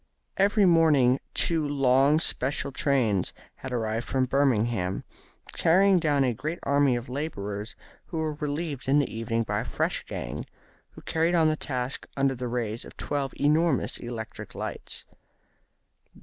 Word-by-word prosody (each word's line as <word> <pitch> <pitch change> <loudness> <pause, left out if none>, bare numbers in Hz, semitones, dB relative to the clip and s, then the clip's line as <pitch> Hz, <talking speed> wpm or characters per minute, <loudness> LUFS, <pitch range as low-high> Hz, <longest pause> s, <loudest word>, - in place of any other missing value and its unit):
Every 200 +1 +4
morning 150 -7 +5 0.2
two 165 -2 +2
long 140 +1 +3
special 140 -3 0
trains 125 -9 +1 0.2
had 130 - -7
arrived 115 -1 -2
from 130 -1 +1
Birmingham, 120 -8 +1 0.5
carrying 190 +3 +4
down 145 -4 +2
a 125 -2 +1
great 155 +9 -4
army 140 -2 +3
of 120 +1 -4
labourers, 110 -6 -4 0.3
who 165 - -5
were 155 -1 -1
relieved 150 -1 -4
in 140 +2 +4
the 145 -5 0
evening 115 0 -1
by - - -1
a - - -2
fresh - - -1
gang, - - -5 0.5
who - - -12
carried 165 +2 +1
on 165 -2 +4
their 155 0 +3
task 130 -3 -3
under 135 -1 +2
the 125 -1 -4
rays 115 -2 -3
of - - -13
twelve 140 -2 -2
enormous 150 0 +2
electric 115 -2 -7
lights. - - -5
135 Hz, 150 wpm, -27 LUFS, 120-155 Hz, 0.5 s, morning